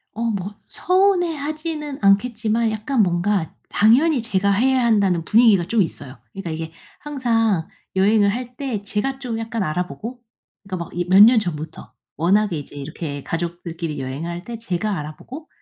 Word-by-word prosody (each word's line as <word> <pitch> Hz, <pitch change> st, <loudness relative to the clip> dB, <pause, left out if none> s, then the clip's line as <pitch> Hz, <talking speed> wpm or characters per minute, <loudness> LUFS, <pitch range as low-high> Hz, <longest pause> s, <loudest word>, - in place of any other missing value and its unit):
어 230 Hz, -, -5 dB
뭐 200 Hz, 0 st, -4 dB
서운해하지는 320 Hz, -6 st, 0 dB
않겠지만 220 Hz, +2 st, +2 dB
약간 220 Hz, +4 st, 0 dB
뭔가 175 Hz, 0 st, 0 dB, 0.2 s
당연히 250 Hz, +6 st, +4 dB
제가 200 Hz, -3 st, +1 dB
해야 255 Hz, +5 st, +3 dB
한다는 195 Hz, -7 st, +2 dB
분위기가 220 Hz, -5 st, +5 dB
좀 225 Hz, +1 st, +2 dB
있어요. 145 Hz, -5 st, -4 dB
그러니까 195 Hz, -4 st, -6 dB
이게 160 Hz, 0 st, -5 dB, 0.3 s
항상 225 Hz, -, 0 dB, 0.3 s
여행을 200 Hz, +1 st, +4 dB
할 245 Hz, 0 st, -6 dB
때 245 Hz, -8 st, -4 dB
제가 215 Hz, +7 st, -2 dB
좀 235 Hz, -4 st, -4 dB
약간 225 Hz, -1 st, -3 dB
알아보고 185 Hz, +9 st, -4 dB, 0.4 s
그러니까 185 Hz, -4 st, -5 dB
막 -, -, -15 dB
이 175 Hz, 0 st, -2 dB
몇 195 Hz, +2 st, +7 dB
년 235 Hz, 0 st, +7 dB
전부터 160 Hz, -5 st, -6 dB, 0.2 s
워낙에 190 Hz, +2 st, +2 dB
이제 145 Hz, -, -11 dB
이렇게 145 Hz, 0 st, -6 dB
가족들끼리 170 Hz, -2 st, -4 dB
여행할 165 Hz, +7 st, -5 dB
때 235 Hz, -1 st, -7 dB
제가 200 Hz, -1 st, -2 dB
알아보고 245 Hz, -, -9 dB
205 Hz, 345 characters per minute, -21 LUFS, 175-240 Hz, 0.4 s, 몇